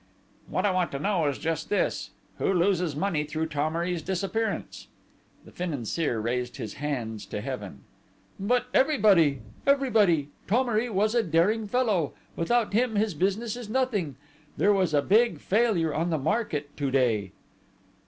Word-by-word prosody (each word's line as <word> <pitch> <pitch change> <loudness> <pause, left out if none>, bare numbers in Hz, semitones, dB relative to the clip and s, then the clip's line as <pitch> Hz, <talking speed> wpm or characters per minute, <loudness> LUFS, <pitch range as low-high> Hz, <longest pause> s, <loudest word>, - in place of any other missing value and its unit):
"What 185 - -1
I 205 - +3
want 185 -1 0
to 140 - -3
know 180 -2 +1
is 140 - -1
just 160 -1 -3
this: 205 - 0 0.3
Who - - +1
loses 180 -4 +1
money 160 -2 0
through 155 +2 -3
Thomery's 165 +3 -1
disappearance?" 195 +6 -3 0.6
The - - -14
Financier 150 -5 -2
raised 125 +3 -2
his 110 -6 -5
hands 115 -8 -3
to 105 - -4
Heaven. 105 - -6 0.6
"But 245 +5 +1
everybody! 200 - +4 0.3
Everybody!... 215 - +3 0.2
Thomery 235 +1 +1
was 215 +1 +1
a 240 - +4
daring 205 +4 +1
fellow: 205 - +1 0.2
without 225 +6 +1
him 230 +1 +2
his 210 -1 +1
business 200 +8 -1
is 240 -3 -8
nothing!... 215 - 0 0.4
There 205 - +4
was 185 -6 +1
a 145 - +3
big 230 +4 +3
failure 195 -7 +1
on 165 +3 0
the 160 - +1
market 150 - -2
to 140 -2 -1
day." 115 -7 +1
180 Hz, 150 wpm, -27 LUFS, 145-215 Hz, 0.6 s, everybody